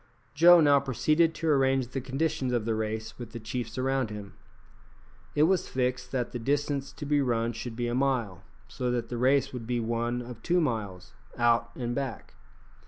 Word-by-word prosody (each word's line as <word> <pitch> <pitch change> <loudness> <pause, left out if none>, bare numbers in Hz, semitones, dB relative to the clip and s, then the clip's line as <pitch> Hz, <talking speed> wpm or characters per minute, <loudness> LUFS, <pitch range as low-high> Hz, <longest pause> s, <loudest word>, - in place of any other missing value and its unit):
Joe 170 +3 +7
now 145 -2 +5
proceeded 155 +5 +1
to 165 - -3
arrange 135 -3 +2
the 135 - -4
conditions 135 -1 -1
of 120 -3 0
the 115 - 0
race 110 +1 -4
with 120 -2 -8
the 115 - -5
chiefs 115 +1 -5
around 130 -2 0
him. 105 -2 -8 1.0
It 150 - +4
was 185 +2 +2
fixed 125 -1 -2
that 125 -3 -2
the 120 - -4
distance 140 +2 -1
to 145 - -7
be 145 0 +2
run 115 -3 0
should 115 +1 -6
be 120 0 -2
a 120 - -2
mile, 125 -8 0 0.3
so 125 - -3
that 120 -1 -2
the 120 - -4
race 135 +2 +2
would 120 -3 -6
be 120 -1 0
one 120 +1 -1
of 120 -2 -10
two 175 +6 +2
miles, 110 - -3 0.2
out 120 0 +3
and 120 -1 -3
back. 135 -2 -5
125 Hz, 190 wpm, -28 LUFS, 115-140 Hz, 1.0 s, Joe